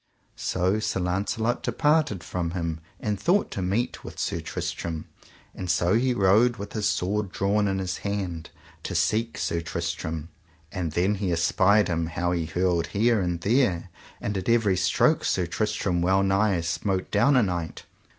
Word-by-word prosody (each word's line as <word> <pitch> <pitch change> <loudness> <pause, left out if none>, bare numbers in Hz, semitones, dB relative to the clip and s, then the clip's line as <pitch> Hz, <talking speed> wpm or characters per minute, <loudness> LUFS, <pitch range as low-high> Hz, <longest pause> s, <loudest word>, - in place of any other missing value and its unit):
So 95 +3 +1
Sir 105 -3 -1
Launcelot 100 +6 -1
departed 150 - +1
from 85 0 -3
him 85 -2 -2 0.2
and 105 -2 -2
thought 185 - +2
to 95 - -3
meet 100 +7 -1
with - - -9
Sir - - -2
Tristram, 80 -2 -4 0.5
and 90 - -6
so 90 +1 +2
he 125 +2 +2
rode 110 +4 +4
with 100 -1 -7
his 105 -1 0
sword 100 -1 -1
drawn 100 +1 +1
in 95 -1 0
his 95 -1 -2
hand 95 -5 -4 0.3
to - - -5
seek 110 +8 +1
Sir 85 - -1
Tristram; 80 -1 -4 0.4
and 85 -5 -3
then 90 +5 +2
he 95 -3 0
espied 95 +5 +3
him 85 -2 -1
how 85 +2 -1
he 85 -2 -1
hurled 90 0 0
here 115 +1 +2
and 85 -2 -2
there, 100 -5 +1 0.3
and 105 - -3
at 95 - -4
every 115 -5 +3
stroke 95 - +2
Sir 90 - +1
Tristram 100 -1 -1
wellnigh 95 +1 +2
smote 95 +3 -2
down 135 +7 +4
a 125 - +5
knight. 85 -4 -3
95 Hz, 165 wpm, -26 LUFS, 85-105 Hz, 0.5 s, a